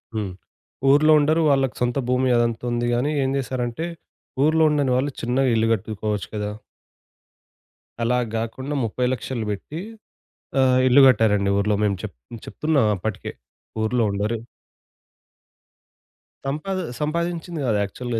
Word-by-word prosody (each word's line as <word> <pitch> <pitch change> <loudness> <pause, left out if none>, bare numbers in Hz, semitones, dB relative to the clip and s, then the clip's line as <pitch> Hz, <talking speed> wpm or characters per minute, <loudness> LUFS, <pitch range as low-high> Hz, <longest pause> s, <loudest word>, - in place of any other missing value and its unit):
హ్మ్. 105 -4 -2 0.6
ఊర్లో 150 +3 +5
ఉండరు. 155 +3 +2
వాళ్ళకి 135 -2 +2
సొంత 120 +2 0
భూమి 130 +1 +2
అదంతా 115 0 0
ఉంది 120 0 0
గాని 125 +5 +1
ఏం 130 - 0
జేశారంటే 130 +2 -3 0.6
ఊర్లో 160 +1 +3
ఉండని 145 -3 +1
వాళ్ళు 140 +3 0
చిన్నగా 125 +2 +1
ఇల్లు 115 0 +2
కట్టుకోవచ్చు 105 -1 -3
కదా! 105 0 -2 1.5
అలా 125 +2 +2 0.2
గాకుండా 130 +6 -3
30,000,00 125 0 -2
బెట్టి 145 +10 -6 0.8
ఆహ్, 130 -1 +4
ఇల్లు 130 +2 +7
గట్టారండి 105 -5 +3
ఊర్లో. 105 +1 +1
మేము 100 -2 +2
చెప్ - - -6 0.3
చెప్తున్నాం 150 -7 +1
అప్పటికే 95 +1 -4 0.5
ఊర్లో 115 +2 +1
ఉండరు 105 +3 -1 2.1
సంపాది 185 +7 -2 0.2
సంపాదించింది 170 +1 -2
గాదు 110 -4 +1
యాక్చువల్‌గా 115 +4 -3
125 Hz, 120 wpm, -23 LUFS, 110-140 Hz, 2.1 s, ఇల్లు